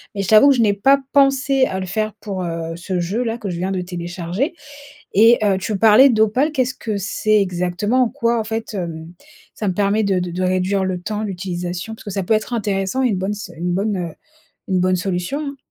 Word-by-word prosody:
mais 200 - -1
je 190 - -3
t'avoue 215 +5 +7
que 275 - +5
je 240 - +2
n'ai 210 -3 +3
pas 270 +8 +4
pensé 275 -1 +3
à 190 - -3
le - - -3
faire 215 +3 -2
pour, 200 -3 -4
heu, 165 -1 -4
ce 180 +1 -3
jeu-là 225 +6 -2
que 210 -4 -5
je 175 - -4
viens 185 +2 -2
de 185 -1 -1
télécharger 175 - -3 0.6
et 225 +4 +6
heu, 200 -2 +3
tu 205 +1 -3
parlais 225 +6 +7
d'Opal 230 +7 +2
qu'est-ce 255 -3 0
que 215 -4 -4
c'est 215 +2 +1
exactement? 185 +6 0
En 245 - +2
quoi, 235 -4 0
en - - -3
fait, 225 +1 -4
hem, 165 -3 -5 0.4
ça 210 - -3
me 185 - -1
permet 205 +3 +1
de 195 -2 +1
de 180 -1 -3
de 180 +2 -3
réduire 185 +1 +1
le 185 -1 -2
temps, 210 +3 -4
l'utilisation? 180 0 -4
Parce - - -15
que 205 - -6
ça 195 0 -2
peut 220 - +2
être 215 +3 -2
intéressant 205 +1 -1
et 255 - +3
une 210 - 0
bonne 190 +2 -2
s 205 -2 -7
une 175 +2 -2
bonne, 200 +3 0
heu, 175 -3 -4 0.6
une 185 -2 +1
bonne 185 0 +2
solution, 180 +7 -2
hein. 285 -2 -5
200 Hz, 235 wpm, -20 LUFS, 180-225 Hz, 0.6 s, t'avoue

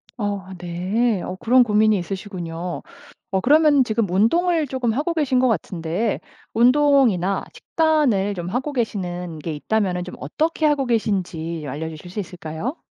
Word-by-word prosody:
어 205 -4 -3
네. 185 +5 0
어 185 - -5
그런 250 +2 +5
고민이 215 -1 +3
있으시군요. 180 -2 -5 0.5
어 190 - +1
그러면 295 +1 +5
지금 220 -4 -1
운동을 315 - +2
조금 255 -3 -1
하고 300 +7 -1
계신 275 -6 +1
것 255 - +4
같은데 180 0 -1 0.3
운동이나 245 -7 +3
식단을 285 - +1
좀 175 -2 -5
하고 260 +8 -2
계시는 180 - -3
게 160 +2 -4
있다면은 180 +2 -1
좀 180 - -8
어떻게 315 - -1
하고 290 -3 +2
계신지 175 -8 -1
알려 150 +5 -4
주실 160 +2 -10
수 200 +4 -5
있을까요? 180 - -5
210 Hz, 315 characters per minute, -22 LUFS, 180-255 Hz, 0.5 s, 그런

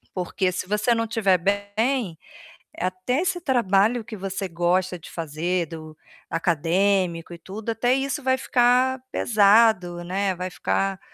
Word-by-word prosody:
Porque 185 +1 -1
se 185 0 -4
você 210 +4 +1
não 230 0 0
tiver 210 -5 +2
bem, 205 +2 -1 0.6
até 185 - -1
esse 360 -1 -1
trabalho 230 - +2
que 220 0 -8
você 195 +1 -4
gosta 180 +2 0
de 165 - -13
fazer, 165 +2 -2
do 155 -1 -10 0.3
acadêmico 170 +2 0
e 170 - -8
tudo, 210 +6 -6
até 245 +3 +1
isso 275 +2 -2
vai 260 0 +2
ficar 255 0 +2
pesado, 200 -5 +3
né, 190 +2 -1
vai 180 +1 -5
ficar, 195 +1 -1
195 Hz, 140 wpm, -24 LUFS, 175-230 Hz, 0.6 s, pesado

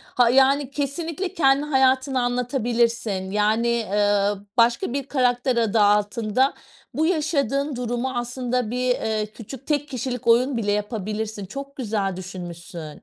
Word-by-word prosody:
Ha, 245 -2 +5
yani, 270 +1 +4
kesinlikle 325 +6 -3
kendi 280 -2 +3
hayatını 265 -2 +2
anlatabilirsin, 235 -5 0
yani, 215 +3 +1
eee, 205 -3 +2 0.3
başka 235 0 +3
bir 275 0 -3
karakter 250 -2 +1
adı 225 -2 +2
altında 210 +5 +2 0.4
bu 315 - +1
yaşadığın 290 -5 0
durumu 245 +1 -2
aslında 245 -1 -2
bir, 250 +1 -1
eee, 220 -3 0
küçük 250 +3 -10
tek 295 -1 0
kişilik 250 -2 -4
oyun 245 +3 +4
bile 205 -3 0
yapabilirsin. 210 0 -3
Çok 275 +7 -8
güzel 205 -6 -2
düşünmüşsün. 175 -4 -8
240 Hz, 130 wpm, -23 LUFS, 210-270 Hz, 0.4 s, Ha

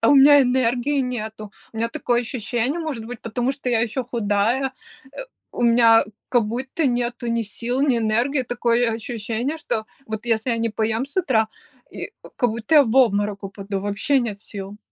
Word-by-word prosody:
А 225 - +3
у - - +7
меня 285 +1 +8
энергии 255 +2 +1
нету. 220 -4 -5 0.2
У - - -11
меня 230 +1 0
такое 240 +1 0
ощущение, 245 +3 -2
может 300 -9 -4
быть, 240 0 -8
потому 240 +3 -1
что 270 -2 -4
я 230 -2 +3
ещё 240 +3 -1
худая, 235 +3 0 0.4
э, - - -17 0.4
у - - -3
меня 230 -1 +6 0.2
как 240 -3 +3
будто 260 +7 -2
нету 240 -1 -1
ни 230 0 0
сил, 235 +4 -3
ни 275 -4 +3
энергии. 235 +5 +1
Такое 240 -1 +1
ощущение, 230 +4 -3
что 220 -8 -3 0.2
вот 220 0 -5
если 225 +1 +1
я 230 - 0
не 230 0 0
поем 220 +2 -1
с 280 - -11
утра, 255 -12 +2 0.4
и, - - -7 0.2
как 245 - +2
будто 230 +7 +1
я 295 - +9
в 225 -1 -2
обморок 205 -5 +3
упаду, 195 0 -5
вообще 205 +8 +1
нет 220 -5 -3
сил. 200 -1 -8
235 Hz, 185 wpm, -22 LUFS, 220-255 Hz, 0.4 s, я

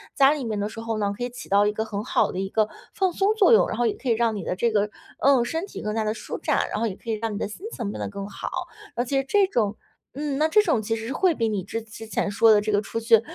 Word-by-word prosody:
家 275 0 +6
里 295 -3 -2
面 215 -2 -2
的 205 +1 -1
时 225 - -9
候 225 -1 -2
呢， 200 -1 0
可 245 - -4
以 245 - -2
起 245 - -10
到 200 +1 +5
一 210 - 0
个 220 - -1
很 210 -2 -4
好 - - +1
的 185 - -4
一 195 0 -2
个 215 +1 +1 0.2
放 380 -1 +1
松 400 +4 +2
作 430 -1 +5
用， - - +6
然 - - -4
后 240 - +2
也 215 - +1
可 260 - -4
以 - - +5
让 225 -1 +1
你 200 - -4
的 180 - -2
这 230 +5 +1
个， 210 -1 +1 0.3
嗯， 270 -3 +5
身 325 +8 -2
体 - - -8
更 210 0 -2
加 220 - +1
地 215 0 0
舒 - - -6
展， - - 0
然 - - -2
后 230 - +1
也 190 - -4
可 230 - -11
以 - - +1
让 220 0 -2
你 205 - -3
的 - - -2
心 215 - -9
情 230 - -4
变 - - -7
得 - - -2
更 200 -1 -6
好。 205 - -6 0.5
而 240 - +1
且 270 +2 0
这 390 +8 +3
种 215 - 0 0.4
嗯， 285 0 -2
那 310 - +3
这 420 +7 +5
种 250 - +1
其 225 +2 -1
实 225 0 -5
是 265 - -3
会 370 +2 +3
比 230 -4 0
你 205 -3 -2
之 225 +4 -4
之 225 0 -10
前 215 - -1
说 225 +2 +5
的 210 - +6
这 215 +1 -1
个 205 0 +3
出 230 - -4
去， 225 -1 +5
225 Hz, 345 characters per minute, -25 LUFS, 210-265 Hz, 0.5 s, 家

